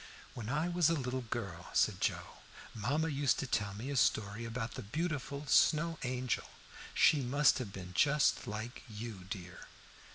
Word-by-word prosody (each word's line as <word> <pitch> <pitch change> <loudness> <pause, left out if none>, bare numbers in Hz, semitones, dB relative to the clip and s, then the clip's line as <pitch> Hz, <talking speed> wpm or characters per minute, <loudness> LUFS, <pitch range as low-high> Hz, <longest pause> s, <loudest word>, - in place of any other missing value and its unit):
"When 115 -3 -6
I 150 +5 +1
was 175 -2 +3
a 165 - +2
little 130 -2 -2
girl," 100 -7 -5
said - - +2
Joe, - - -2 0.4
"mamma 140 +9 0
used 140 -3 +2
to - - -2
tell 100 -5 -1
me 120 +7 -5
a - - -2
story 110 -2 +1
about 115 0 -3
the - - -6
beautiful 145 - -3
Snow 160 +3 +3
Angel: 125 -1 -1 0.5
she 150 - +5
must 140 +3 +3
have 115 -6 -5
been 90 -2 -8
just 145 +6 +3
like 110 +4 -5
you, 105 -3 -7
dear." 90 -4 -7
125 Hz, 165 wpm, -34 LUFS, 105-145 Hz, 0.5 s, she